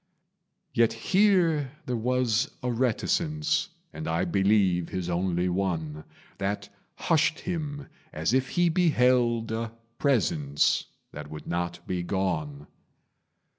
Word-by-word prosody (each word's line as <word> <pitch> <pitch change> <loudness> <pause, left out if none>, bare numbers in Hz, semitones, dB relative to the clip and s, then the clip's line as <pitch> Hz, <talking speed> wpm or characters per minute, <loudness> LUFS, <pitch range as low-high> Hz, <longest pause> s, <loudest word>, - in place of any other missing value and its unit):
Yet 115 -1 +3
here 165 - +2
there 125 - -2
was 125 +2 +1
a 125 - 0
reticence, 155 - 0 0.2
And 80 - -6
I 80 +1 0
believe 95 -3 +2
his 90 -1 -3
only 90 0 0
one, 80 -5 -2 0.3
That 100 +1 -2 0.3
hushed 160 0 +1
him 150 -5 -4 0.3
as 80 +8 -1
if 130 0 +2
he 175 -1 +2
beheld 125 -9 +3
A 115 0 -2 0.3
Presence 80 - +2 0.3
that 75 0 -8
would 75 0 -8
not 85 0 -3
be 90 -1 -2
gone. 85 -6 -2
110 Hz, 115 wpm, -27 LUFS, 85-140 Hz, 0.3 s, Yet